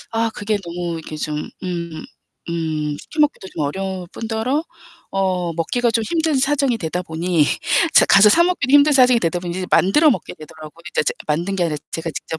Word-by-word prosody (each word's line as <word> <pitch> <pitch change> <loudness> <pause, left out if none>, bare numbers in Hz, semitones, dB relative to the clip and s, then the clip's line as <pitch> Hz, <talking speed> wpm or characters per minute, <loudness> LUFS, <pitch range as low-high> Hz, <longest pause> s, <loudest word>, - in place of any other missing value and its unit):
아 225 0 0
그게 210 0 -1
너무 170 0 -4
이렇게 155 -1 -8
좀 150 0 -4
음 170 -3 -5 0.5
음 155 -3 -2
시켜 310 - -5
먹기도 285 -10 +1
좀 160 - -5
어려울 190 +4 -4
뿐더러 230 +6 -2 0.5
어 185 -3 -1
먹기가 235 +9 0
좀 225 0 0
힘든 320 +2 0
사정이 275 -2 +1
되다 180 -3 -3
보니 170 -1 0 0.5
제가 - - +7
가서 200 +2 +8
사 335 +11 +5
먹기도 355 -8 -1
힘든 290 +1 +6
사정이 255 -3 +5
되다 175 -2 -1
보니 175 0 -5
이제 185 -1 -3
만들어 300 - +4
먹게 240 - -3
되더라고요. 155 +1 -13
이제 - - 0
제가 - - -1
만든 170 +6 -1
게 180 - +1
아니라 160 -3 -1
제가 165 0 -4
직접 160 - -6
185 Hz, 390 characters per minute, -20 LUFS, 165-235 Hz, 0.5 s, 가서